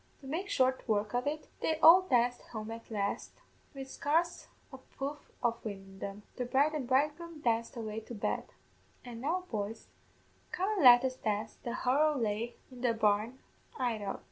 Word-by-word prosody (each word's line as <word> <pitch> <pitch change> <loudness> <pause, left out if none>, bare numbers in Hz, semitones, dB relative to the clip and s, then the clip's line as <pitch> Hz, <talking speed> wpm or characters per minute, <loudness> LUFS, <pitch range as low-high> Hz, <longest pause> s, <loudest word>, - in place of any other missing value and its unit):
To - - -13
make 345 +8 -3
short 260 -6 +2
work 210 -1 0
of 245 +3 0
it, 300 +1 -3
they 320 - 0
all 335 +4 +9
danced 245 -2 +2
home 215 0 -5
at 230 0 -9
last, 200 -2 -2 0.4
wid 270 -1 -6
scarce 325 +6 0 0.3
a 265 - -8
puff 280 +2 -7
of 235 -1 0
wind 200 -3 -6
in 195 0 -14
them; 200 +2 -6
the 250 - -1
bride 275 +5 +2
and 285 -5 -3
bridegroom 300 +5 0
danced 230 -1 0
away 220 -1 -4
to 225 +2 -9
bed; 205 - -1 0.6
an' 235 -2 -8
now, 340 +7 0
boys, 215 0 -4 0.6
come 380 +3 0
an' - - +2
let 245 0 +9
us 260 0 -2
dance 215 -1 -2
the 240 0 -4
Horo 290 +5 +2
Lheig 230 0 -1 0.2
in 250 -1 -11
the 240 -2 +2
barn 215 +3 +1 0.4
'idout. 220 -6 -2
245 Hz, 180 wpm, -32 LUFS, 220-285 Hz, 0.6 s, all